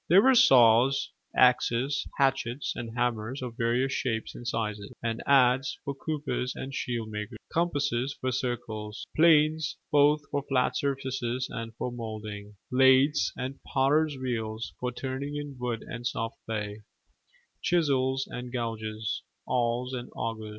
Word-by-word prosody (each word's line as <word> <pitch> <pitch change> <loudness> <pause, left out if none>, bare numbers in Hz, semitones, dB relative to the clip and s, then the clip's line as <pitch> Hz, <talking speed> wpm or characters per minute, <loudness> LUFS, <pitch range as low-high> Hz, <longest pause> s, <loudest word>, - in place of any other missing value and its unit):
There 190 +5 +7
were 265 - +6
saws, 130 - +6 0.2
axes, 125 +2 +3
hatchets, 135 -1 +1
and 115 0 -6
hammers 120 +2 -1
of 120 -2 -5
various 120 +3 +1
shapes 115 -3 -2
and 120 - -8
sizes; 105 -3 -3
an 115 0 -2
adze 135 0 +4
for 140 - -2
coopers 145 -3 -3
and 135 +1 -6
shield 120 -4 -3
makers; 105 +2 -5 0.2
compasses 140 -6 0
for 130 - -1
circles; 110 -4 -4
planes 155 -1 +4
both 150 +1 +5
for 145 - 0
flat 130 -2 +2
surfaces 130 -2 -1
and 115 -1 -6
for 125 - -3
moulding; 110 -3 -7 0.2
lathes 130 +3 +5
and 130 +2 -5
potter's 145 +2 +2
wheels 115 -3 -3
for 125 0 -2
turning 135 +3 -4
in 145 -1 -5
wood 120 -2 -2
and 120 +1 -5
soft 115 -1 -3
clay; 105 -1 -4 0.8
chisels 135 -6 +2
and 125 0 -7
gouges, 110 -3 -3 0.2
awls, 125 +1 0
and 120 -1 -5
augers. 110 -1 -4
125 Hz, 135 wpm, -28 LUFS, 115-135 Hz, 0.8 s, There